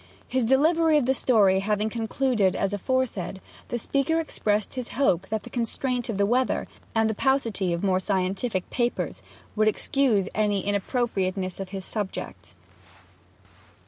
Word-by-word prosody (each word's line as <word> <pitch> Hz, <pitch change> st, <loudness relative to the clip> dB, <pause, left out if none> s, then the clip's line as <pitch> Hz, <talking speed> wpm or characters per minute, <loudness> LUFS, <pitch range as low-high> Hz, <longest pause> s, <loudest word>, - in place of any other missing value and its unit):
His 255 Hz, -1 st, 0 dB
delivery 315 Hz, +5 st, +4 dB
of 285 Hz, -, +2 dB
the 265 Hz, -, +3 dB
story 205 Hz, -8 st, +4 dB
having 210 Hz, +2 st, 0 dB
concluded 225 Hz, -2 st, +1 dB
as 195 Hz, 0 st, -1 dB
aforesaid, 210 Hz, -3 st, -1 dB, 0.3 s
the 240 Hz, -, -2 dB
speaker 275 Hz, +7 st, 0 dB
expressed 210 Hz, -9 st, -1 dB
his 255 Hz, -2 st, -4 dB
hope 190 Hz, -11 st, +2 dB
that 220 Hz, 0 st, -2 dB
the -, -, -10 dB
constraint 245 Hz, +1 st, -2 dB
of 215 Hz, -, -2 dB
the 200 Hz, -, +3 dB
weather, 250 Hz, +4 st, +1 dB, 0.3 s
and 225 Hz, 0 st, +3 dB
the 220 Hz, -, 0 dB
paucity 230 Hz, -7 st, +1 dB
of 170 Hz, +2 st, -2 dB
more 185 Hz, -2 st, +2 dB
scientific 190 Hz, +1 st, -1 dB
papers, 240 Hz, -1 st, -1 dB, 0.3 s
would 215 Hz, 0 st, +3 dB
excuse 215 Hz, -3 st, +2 dB
any 205 Hz, -2 st, 0 dB
inappropriateness 195 Hz, -3 st, -1 dB
in 195 Hz, -, -4 dB
his 190 Hz, 0 st, -6 dB
subject. 205 Hz, -3 st, -5 dB
220 Hz, 145 wpm, -26 LUFS, 195-255 Hz, 0.3 s, delivery